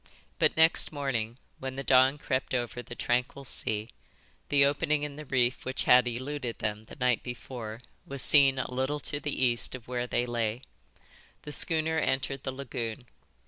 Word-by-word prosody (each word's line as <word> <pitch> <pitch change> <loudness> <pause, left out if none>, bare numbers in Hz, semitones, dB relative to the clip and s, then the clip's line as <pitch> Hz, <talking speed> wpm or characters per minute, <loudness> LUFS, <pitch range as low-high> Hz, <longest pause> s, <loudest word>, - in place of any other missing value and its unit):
But - - +3
next 160 +1 +5
morning, 125 -6 -2 0.2
when 130 0 -5
the 135 - -4
dawn 130 +2 +5
crept 130 -2 -2
over 120 0 -2
the 120 - -10
tranquil 125 +3 -1
sea, 110 -2 -1 0.6
the 140 -1 +5
opening 145 +1 +1
in 145 -1 -4
the 150 0 -9
reef 125 -1 +1
which 130 0 -2
had 125 0 +6
eluded 125 0 -4
them 105 0 -3
the - - -12
night 125 -4 +1
before 120 -2 -7 0.2
was 140 -1 -1
seen 135 -2 +6
a 130 - -3
little 130 +3 -1
to 145 +1 -2
the 140 -2 -1
east 120 +1 +2
of 125 -3 -11
where 125 0 -2
they 120 - 0
lay. 120 0 -2 0.8
The 150 - -7
schooner 160 +1 +2
entered 135 -1 -1
the 130 - -3
lagoon. 125 -3 -5
130 Hz, 175 wpm, -29 LUFS, 120-140 Hz, 0.8 s, had